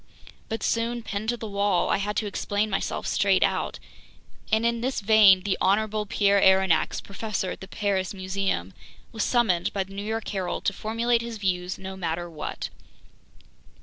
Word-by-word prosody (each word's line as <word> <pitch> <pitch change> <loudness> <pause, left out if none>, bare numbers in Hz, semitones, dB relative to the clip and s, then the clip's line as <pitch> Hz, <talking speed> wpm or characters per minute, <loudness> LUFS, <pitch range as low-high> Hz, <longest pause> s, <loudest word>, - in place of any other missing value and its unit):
But 225 0 -3
soon, 230 +1 0
pinned 215 0 -3
to 240 - 0
the 225 - -6
wall, 200 -3 +1
I - - +3
had 205 +1 -2
to 220 - 0
explain 205 +1 -1
myself 195 - -2
straight 195 -2 +3
out. - - 0 0.7
And 220 +1 +3
in 235 0 +1
this 260 +2 -1
vein, 200 -3 +6
"the 200 -1 -1
honorable 210 +2 +1
Pierre 200 -2 +3
Aronnax, 190 -3 +4
Professor 200 -2 -3
at - - -8
the 190 - -8
Paris 195 -3 -1
Museum," 185 - -2 0.4
was 220 - -2
summoned 220 -9 +2
by 195 - 0
The 195 +1 -14
New 200 - -4
York 220 +1 -3
Herald 190 -4 -3
to 200 - +2
formulate 230 +3 0
his 235 -1 -5
views 180 -2 -1
no 190 0 -7
matter 175 -1 -3
what. 160 -3 -6
200 Hz, 175 wpm, -26 LUFS, 190-220 Hz, 0.7 s, vein